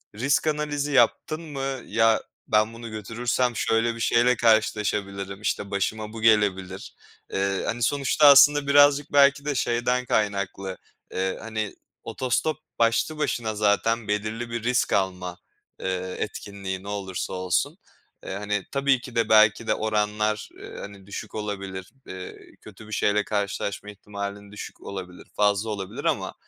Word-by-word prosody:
risk 140 +7 +1
analizi 150 -1 -1
yaptın 140 +4 +2
mı? 135 -4 -4
"Ya, 115 -1 +3 0.3
ben 110 +1 +2
bunu 115 0 -8
götürürsem 120 +3 -1
şöyle 115 +1 +1
bir 115 - -9
şeyle 120 +2 +3
karşılaşabilirim. 105 -3 +1
İşte, 100 -1 -2
başıma 105 +2 -2
bu 115 - -7
gelebilir." 100 -4 +1 0.4
Eee, 95 0 0
hani, 120 +1 -2
sonuçta 145 +3 +3
aslında 140 +1 +7
birazcık 145 +1 +5
belki 140 0 +5
de 145 -1 -1
şeyden 125 +1 0
kaynaklı, 100 -4 -1 0.4
eee, 95 0 -1
hani, 110 -2 -4 0.3
otostop 130 +5 -1 0.2
başlı 115 +7 +2
başına 115 -7 -1
zaten 105 +2 +1
belirli 110 +3 -2
bir 115 -1 -4
risk 125 +1 +1
alma, 90 -2 -1 0.4
eee, 95 0 -3
etkinliği, 95 -2 -5
ne - - -10
olursa 95 -3 -4
olsun. 90 -1 -1 0.5
Eee, - - -5
hani, 105 0 -2
tabii 140 -2 +2
ki 125 -1 -10
de 115 - +1
belki 110 +1 +5
de - - +3
oranlar, 105 0 -1
eee, - - -10
hani, 100 -1 -10
düşük 100 - -7
olabilir. 100 -3 -5 0.2
Eee, 95 0 -8 0.2
kötü 105 +1 -13
bir - - -12
şeyle 105 0 +2
karşılaşma 100 0 -3
ihtimalin 100 0 -7
düşük 105 - -9
olabilir, 90 -2 -8
fazla 105 +1 +2
olabilir. 100 -3 -5
Ama, - - 0
110 Hz, 145 wpm, -25 LUFS, 100-120 Hz, 0.5 s, aslında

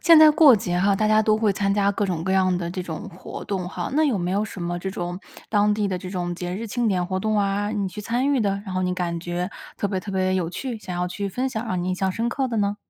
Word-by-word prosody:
现 335 -2 +7
在 310 0 +9
过 300 -5 +7
节 180 -3 -1
哈， 195 +2 +3
大 215 - +1
家 215 0 +4
都 215 0 +3
会 215 -2 +2
参 200 0 0
加 200 0 +2
各 205 - -1
种 170 -3 -2
各 190 - 0
样 185 -1 +3
的 170 -1 -3
这 185 +1 -4
种 175 +4 -6
活 185 -1 -8
动 185 -3 -3
哈。 175 -1 -4
那 310 +2 +4
有 260 -9 +1
没 175 0 -1
有 205 +2 +1
什 210 -3 -8
么 175 0 -2
这 190 +2 -4
种 175 0 -4 0.3
当 210 -1 +3
地 210 -1 0
的 185 -2 -2
这 180 0 -7
种 175 -2 -2
节 180 +1 -4
日 225 +4 -4
庆 235 +2 0
典 180 -3 +1
活 185 +1 -2
动 215 +1 +1
啊， 200 +1 0
你 205 -3 -1
去 210 +3 -7
参 245 +6 0
与 270 - +2
的， 200 -2 0
然 190 - -5
后 185 - 0
你 180 0 0
感 175 -2 -2
觉 175 +1 -3 0.3
特 - - -1
别 190 -2 -2
特 200 - -7
别 185 0 +1
有 175 -3 -1
趣， 245 +4 -4
想 185 -4 -6
要 180 0 0
去 200 +2 -3
分 255 +7 -1
享， 240 -2 -4
让 185 -4 -1
你 180 - -2
印 185 - 0
象 190 +1 0
深 230 +5 -1
刻 265 +1 -1
的 235 - -2
呢？ 205 0 +1
195 Hz, 325 characters per minute, -24 LUFS, 180-215 Hz, 0.3 s, 在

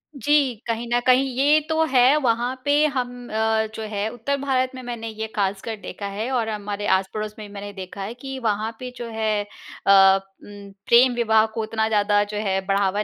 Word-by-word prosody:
जी, 275 -1 +2
कहीं 230 +1 -2
न 240 - +4
कहीं 255 +1 +5
ये 295 +3 +5
तो 320 0 +2
है 260 0 +4
वहाँ 245 -1 0
पे 290 +1 +4
हम 245 -1 -4 0.5
जो 220 - -5
है 205 0 -2
उत्तर 280 +4 -2
भारत 260 -2 0
में 255 - -7
मैंने 235 -2 -5
ये 220 0 -5
ख़ासकर 200 +2 -2
देखा 200 - -7
है 215 +5 -4
और 230 -3 0
हमारे 205 -1 -4
आस-पड़ोस 210 +3 -1
में 210 - -7
भी 200 - -14
मैंने 205 0 -7
देखा 190 +1 -8
है 215 +4 -5
कि 270 +2 -7
वहाँ 220 -1 -1
पे 250 -1 -6
जो 240 - -6
है 215 -2 -1 0.4
अ, 195 0 +7 0.2
उम, 200 -1 -11 0.2
प्रेम 245 +1 +6
विवाह 220 -2 +3
को 225 - -2
उतना 220 0 -1
ज़्यादा 205 -1 +2
जो 205 0 -6
है 190 0 +1
बढ़ावा 200 +1 +1
220 Hz, 200 wpm, -23 LUFS, 205-250 Hz, 0.5 s, अ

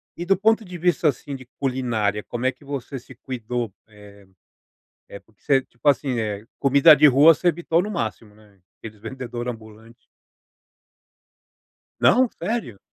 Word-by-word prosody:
e 175 - -5
do 195 +2 +2
ponto 220 +3 +2
de 180 -3 -9
vista, 175 -2 +2
assim, 140 +1 -5
de 130 -1 -11
culinária 115 -6 -1
como 120 +1 -5
é 130 - +3
que 145 - -22
você 140 -1 -6
se 125 +2 -16
cuidou, 120 -3 -5
eh 100 -2 -17 0.8
eh, 100 - -10
porque 110 0 -32
você, 135 -2 +2
tipo 125 +2 -9
assim, 135 -3 +2
eh, 105 -1 -4
comida 140 +3 +6
de 150 +2 +5
rua 145 +4 +7
você 175 - +1
habituou 170 0 0
no 210 - -5
máximo 110 - -4
né, 105 -2 -23 0.2
aqueles 110 -2 -11
vendedor 120 0 -6
ambulante. 110 0 -10 1.9
Não, 255 +1 +4
sério? 190 - -3
125 Hz, 160 wpm, -22 LUFS, 110-150 Hz, 1.9 s, rua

